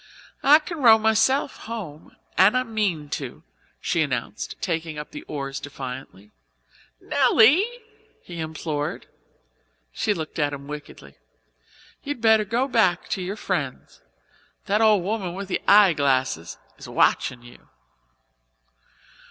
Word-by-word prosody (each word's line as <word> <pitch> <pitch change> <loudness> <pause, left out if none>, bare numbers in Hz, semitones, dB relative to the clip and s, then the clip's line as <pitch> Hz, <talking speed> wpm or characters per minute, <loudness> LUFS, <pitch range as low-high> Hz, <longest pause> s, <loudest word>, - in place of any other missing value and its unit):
"I 290 +2 +7
can 325 +1 -7
row 230 -5 +7
myself 220 +6 +2
home 180 -10 -8 0.2
and 205 +6 +5
I 255 - +1
mean 205 -10 -2
to," 135 -4 -6 0.4
she - - 0
announced, - - -3
taking 165 -2 -3
up 150 - -7
the 300 - -8
oars 135 -2 -4
defiantly. 130 -7 -9 0.7
"Nelly," 280 - +4 0.6
he 175 -1 -9
implored. 155 -2 -4 1.0
Nelly 210 - +3
looked 160 0 -6
at 145 -1 +1
him 140 0 -7
wickedly. 145 - -10 0.8
"You'd 285 -3 -5
better 220 -1 +4
go 235 +6 0
back 220 -9 +1
to 190 - -2
your 185 +3 -4
friends. - - -4 0.6
That 210 +2 +1
old 215 -4 +4
woman 190 -3 -3
with 195 0 -6
the - - -1
eyeglasses 140 - +3 0.2
is - - -10
watchin' 120 -2 +1
you." 120 0 -16
180 Hz, 125 wpm, -24 LUFS, 145-220 Hz, 1.0 s, I